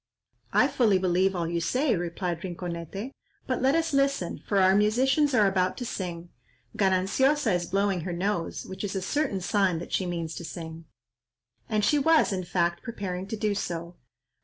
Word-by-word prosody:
"I - - +4
fully 215 -6 +3
believe 185 +1 +2
all 170 -2 -1
you 170 0 -1
say," 255 - +1
replied 175 0 -3
Rinconete, 180 - -5 0.3
"but 255 -2 -1
let 265 +3 +3
us 330 -2 0
listen, 275 -10 +1
for 200 - +1
our 190 0 +5
musicians 260 +8 +3
are 215 -3 +5
about 185 -1 +1
to 245 - -4
sing. 175 -5 -5 0.5
Gananciosa 205 +7 +2
is 175 -1 -1
blowing 195 -1 +1
her 180 - -4
nose, 175 0 -2
which 190 - -7
is 200 -1 -3
a 190 - -1
certain 205 -5 -1
sign 190 -2 +1
that 170 - -7
she 185 - 0
means 170 -2 -3
to - - -6
sing." 160 -1 -8 0.8
And 215 -2 +1
she 295 +6 +3
was, 320 -6 +4
in 185 -1 -3
fact, 170 -1 0
preparing 195 -5 -5
to 220 - -4
do 210 -1 0
so. 170 -3 -4
190 Hz, 180 wpm, -27 LUFS, 175-220 Hz, 0.8 s, our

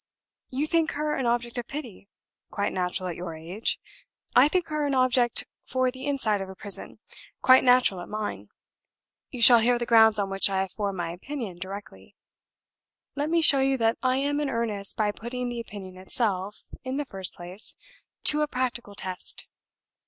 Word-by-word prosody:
You 270 +4 -1
think 325 0 +1
her 300 +1 -1
an 260 - -1
object 240 0 -1
of 235 - -6
pity 245 -9 -8 0.4
quite 200 - -2
natural 185 0 -2
at 170 - -4
your 175 -2 -6
age. 175 +7 -2 0.6
I 255 +3 +8
think 355 +2 0
her 305 -1 -1
an 280 - 0
object 255 -2 +2 0.2
for 255 -1 0
the 260 +2 -8
inside 220 -8 0
of 190 - -6
a 190 - -9
prison 200 +1 -3 0.5
quite 260 0 +7
natural 250 -7 +4
at - - -9
mine. 205 - -4 0.8
You 245 -2 0
shall 240 0 +10
hear 240 +2 +3
the 240 - -2
grounds 220 -2 +6
on 200 -1 -1
which 195 +1 +3
I 190 -1 0
have 190 - -3
formed 200 -3 -3
my 170 -1 -2
opinion 200 -1 -6
directly. 195 +2 -9 1.0
Let 290 +2 -1
me 335 0 +2
show 280 -3 +7
you 270 0 +2
that 225 -1 +1
I 255 0 +2
am 285 +2 0
in 295 -2 -1
earnest 215 -5 -2
by 210 -1 +2
putting 245 +3 -5
the 240 -1 -4
opinion 195 -4 -9
itself, 200 -1 -2 0.2
in 260 +1 -3
the 290 - -2
first 190 -7 -6
place, 180 +4 -6 0.5
to 300 0 +4
a 300 - +2
practical 245 -6 -3
test. 185 -2 -4
235 Hz, 185 wpm, -26 LUFS, 195-260 Hz, 1.0 s, shall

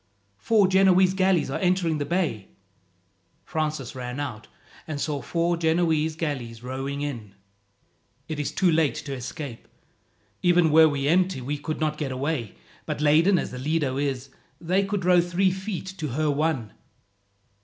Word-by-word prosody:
"Four 210 - +3
Genoese 190 -1 +4
galleys 185 -6 +2
are - - -2
entering 180 -4 +1
the 145 - -1
bay!" 165 - -1 1.0
Francis 155 -5 -3
ran 125 +1 -5
out, 125 -7 -5 0.4
and 155 -3 -4
saw 145 -2 -2
four 170 0 0
Genoese 160 -1 +1
galleys 125 -8 -4
rowing 135 +3 -4
in. 115 -9 -5 0.9
"It 155 -2 -4
is 145 - -2
too 185 -3 +2
late 155 -3 +2
to 140 - -5
escape. 130 0 -7 0.7
Even 175 -3 +4
were 160 +1 +7
we 140 -1 -1
empty 180 0 +2
we 140 +3 -4
could 155 +1 -4
not 155 -1 -1
get 140 -3 -2
away; 130 -4 -3 0.3
but - - -3
laden 160 +6 +4
as - - -2
the 125 - -6
Lido 145 -1 0
is, 135 -2 -2 0.3
they 185 +4 +1
could 195 -2 -2
row 180 -1 +6
three 175 +2 +1
feet 190 0 -5
to 155 - -2
her 150 +3 0
one." 145 -7 -1
155 Hz, 155 wpm, -25 LUFS, 140-175 Hz, 1.0 s, were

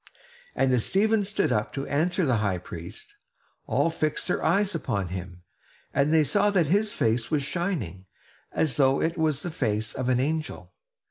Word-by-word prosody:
And 130 0 +2
as 120 -3 +2
Stephen 215 +2 +2
stood 200 -8 0
up 105 -2 0
to 135 0 -3
answer 175 +5 +1
the 130 -5 +2
high 100 -4 0
priest, 85 - -9 0.5
all 165 - +2
fixed 155 -2 -1
their - - -1
eyes 195 +4 +2
upon 100 - -2
him; 90 -1 -7 0.5
and 140 +2 +2
they 160 -1 +5
saw 205 +7 +2
that 190 -5 +2
his 205 +7 +1
face 115 - 0
was 150 -3 +1
shining, 140 - -3 0.4
as 145 -7 0
though 135 -1 +4
it 165 +1 0
was 155 -4 0
the 175 - -3
face 110 -7 -1
of 130 -1 -2
an 125 -1 +3
angel. 155 +4 -3
145 Hz, 180 wpm, -26 LUFS, 110-175 Hz, 0.5 s, they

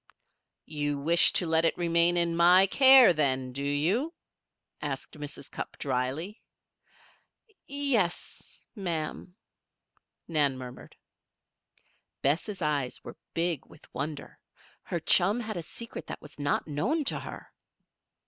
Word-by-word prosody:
"You 145 -1 -2
wish 165 +5 +4
to 180 - +1
let 160 0 +2
it 165 - +1
remain 170 0 +2
in 170 -1 +1
my 180 +3 +6
care, 260 0 +7
then, 130 -4 0
do 140 - -4
you?" 175 - 0 0.7
asked - - -5
Mrs. 145 -2 -9
Cupp, - - -7
drily. 140 - -3 1.3
"Ye 285 0 -2
yes, 185 -8 -2
ma'am," 175 -2 -4 0.9
Nan 145 -5 +1
murmured. 125 -1 -10 1.3
Bess' 170 +7 0
eyes 145 -4 -1
were - - -10 0.2
big 165 -3 -1
with - - -19
wonder. 140 +2 -6 0.4
Her 175 - -4
chum 195 +7 +3
had 220 -2 -5
a 175 - -3
secret 230 +8 -9
that - - -6
was 150 0 -14
not 145 +2 0
known 240 - -1
to - - 0
her! - - -10
165 Hz, 125 wpm, -28 LUFS, 145-190 Hz, 1.3 s, care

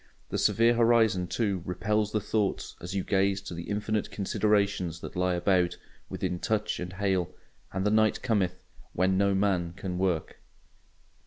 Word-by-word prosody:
The - - -2
severe 115 +1 +4
horizon, 115 -6 +3
too, 100 -2 -1
repels 105 +4 -1
the 105 - +1
thoughts 105 -1 -1
as 90 +3 -6
you 95 - 0
gaze 100 0 +1
to 95 - -7
the 85 +2 -7
infinite 105 0 -1
considerations 100 -4 0
that - - -8
lie 90 0 +1
about, 90 -1 +2 0.3
within 90 - -3
touch 110 +2 -1
and 90 +1 -5
hail; 95 -2 -1 0.4
and 95 +1 -2
the 105 - +3
night 110 0 +2
cometh, 95 -6 0 0.3
when 95 +2 +2
no 100 +1 +2
man 95 -4 +1
can 90 -1 -5
work. 90 -4 -1
95 Hz, 160 wpm, -28 LUFS, 90-105 Hz, 0.4 s, severe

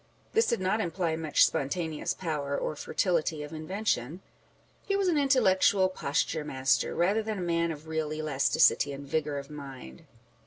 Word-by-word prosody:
This 450 - +3
did 235 - +1
not 190 +4 0
imply 170 -3 -1
much 160 -2 +4
spontaneous 155 +2 -2
power 150 -5 -2
or 155 - -3
fertility 160 -2 -1
of 150 - -9
invention; 165 - -2 0.7
he 395 - +1
was 395 -1 +1
an 345 - +2
intellectual 195 -8 +4
posture 155 -2 -1
master, 135 -2 0
rather 195 +6 +2
than 215 -1 -4
a - - -4
man 170 -1 0
of 155 0 -9
real 160 -1 -2
elasticity 145 -1 +2
and 140 +1 -8
vigour 150 0 -1
of 140 +1 -7
mind. 135 - -10
160 Hz, 160 wpm, -29 LUFS, 145-185 Hz, 0.7 s, much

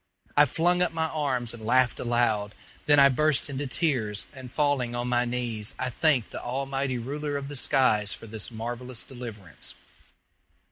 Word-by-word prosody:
I 145 - +7
flung 175 +2 +2
up 180 - +2
my 160 -1 0
arms 130 -7 -1
and 115 -2 -10
laughed 125 +2 +3
aloud. 115 -4 0 0.3
Then 145 0 +6
I 140 - +9
burst 145 +1 +2
into 140 +1 -3
tears, 125 - 0
and 130 -3 -10
falling 140 -5 0
on 120 0 -2
my 125 0 +2
knees, 120 -3 -3
I 130 - -2
thanked 135 -3 +2
the - - -6
Almighty 135 +1 -2
Ruler 145 +4 -3
of 140 0 -6
the 145 - -6
skies 110 -6 +2
for - - -5
this 110 -1 -5
marvellous 120 +2 -6
deliverance. 115 - -9
125 Hz, 170 wpm, -27 LUFS, 120-145 Hz, 0.3 s, I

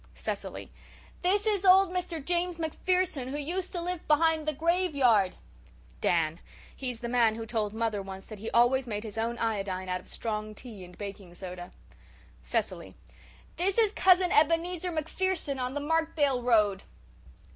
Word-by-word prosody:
CECILY: - - -5 0.5
"This 390 +4 +2
is 415 -3 +1
old 380 0 +6
Mr. 350 -5 -3
James 350 0 0
MacPherson 335 -3 0
who 275 +3 -4
used 345 +6 -2
to 355 - -2
live 355 0 -4
behind 315 0 +3
the - - +3
graveyard." 280 - +2 0.7
DAN: 165 -1 +1 0.4
"He's 250 -3 -4
the 235 - -3
man 235 -2 +3
who 225 0 -5
told 220 -2 -1
mother 220 -2 -1
once 195 0 -8
that 215 -2 -10
he 220 - -4
always 245 +2 +3
made 210 -2 -3
his 220 -1 -6
own 230 +1 -1
iodine 195 -5 -2
out 180 0 -1
of - - -20
strong 215 -1 -4
tea 215 -5 -10
and 180 0 -13
baking 195 -3 -8
soda." 180 -1 -7 0.7
CECILY: - - -3 0.6
"This 375 +4 0
is 440 -3 +5
Cousin 370 -3 +4
Ebenezer 335 +3 +2
MacPherson 320 -2 -1
on 255 +2 -2
the - - 0
Markdale 295 -3 +1
road." 210 -5 +3
265 Hz, 155 wpm, -29 LUFS, 215-345 Hz, 0.7 s, old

